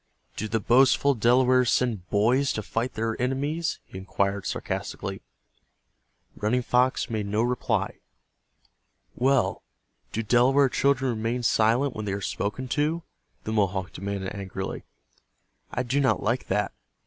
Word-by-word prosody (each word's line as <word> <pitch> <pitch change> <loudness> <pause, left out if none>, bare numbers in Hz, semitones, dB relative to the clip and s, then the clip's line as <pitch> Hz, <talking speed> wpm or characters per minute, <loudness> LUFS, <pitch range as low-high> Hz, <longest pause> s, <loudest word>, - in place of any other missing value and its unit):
"Do 110 - -3
the 115 +1 0
boastful 130 +5 +4
Delawares 125 +1 +4
send 110 -8 0
boys 120 +7 +2
to 110 - -3
fight 115 +4 -2
their 110 0 -1
enemies?" 145 +6 -1
he 95 - -9
inquired, 100 +1 -1
sarcastically. - - -4 1.1
Running 120 +4 0
Fox 125 +2 +2
made 105 -2 -2
no 105 +3 +1
reply. 125 0 -1 1.2
"Well, 135 +1 +2 0.5
do 115 - -2
Delaware 130 +5 +4
children 135 -1 +2
remain 115 +2 -2
silent 115 +4 +2
when 110 - -4
they 100 - -2
are 100 - -2
spoken 105 +6 -3
to?" 155 +5 0 0.4
the 110 - -3
Mohawk 95 -3 0
demanded, 100 0 -4
angrily. 95 -1 -5 0.9
"I 125 - -1
do 130 +3 0
not 135 -2 +2
like 120 +4 0
that. 105 +2 0
120 Hz, 135 wpm, -26 LUFS, 105-130 Hz, 1.2 s, boastful